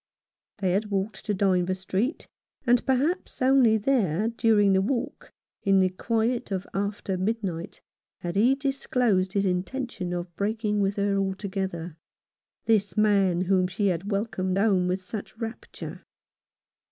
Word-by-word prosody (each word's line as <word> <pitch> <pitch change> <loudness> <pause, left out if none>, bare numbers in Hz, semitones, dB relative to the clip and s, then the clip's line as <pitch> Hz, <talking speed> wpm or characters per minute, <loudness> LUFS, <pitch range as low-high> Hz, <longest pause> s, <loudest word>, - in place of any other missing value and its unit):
They 190 -3 0
had 205 +3 0
walked 195 0 -2
to 210 - 0
Dynevor 185 -1 +2
Street, 190 - -2 0.4
and 245 -1 +4
perhaps 285 +8 0
only 255 -4 +5
there, 215 - +1
during 220 -4 +3
the 190 - +4
walk, 235 +4 -3 0.3
in 195 -1 +4
the 185 -1 +4
quiet 230 +5 -1
of 190 0 -2
after 200 -1 -2
midnight, 190 -4 -3 0.4
had 175 +1 -4
he 240 +7 +4
disclosed 250 -8 0
his 200 0 +1
intention 190 +1 -2
of 175 -1 -4
breaking 210 0 -1
with 195 0 +1
her 200 0 +1
altogether 190 -4 -3 0.3
— - - -60
this 215 -2 +1
man 200 -4 +3
whom 185 0 +2
she 195 +2 0
had 180 +3 -2
welcomed 195 -3 -1
home 195 -3 +3
with 185 +1 -1
such 215 +3 -7
rapture. 225 0 -7
200 Hz, 140 wpm, -26 LUFS, 185-225 Hz, 0.4 s, only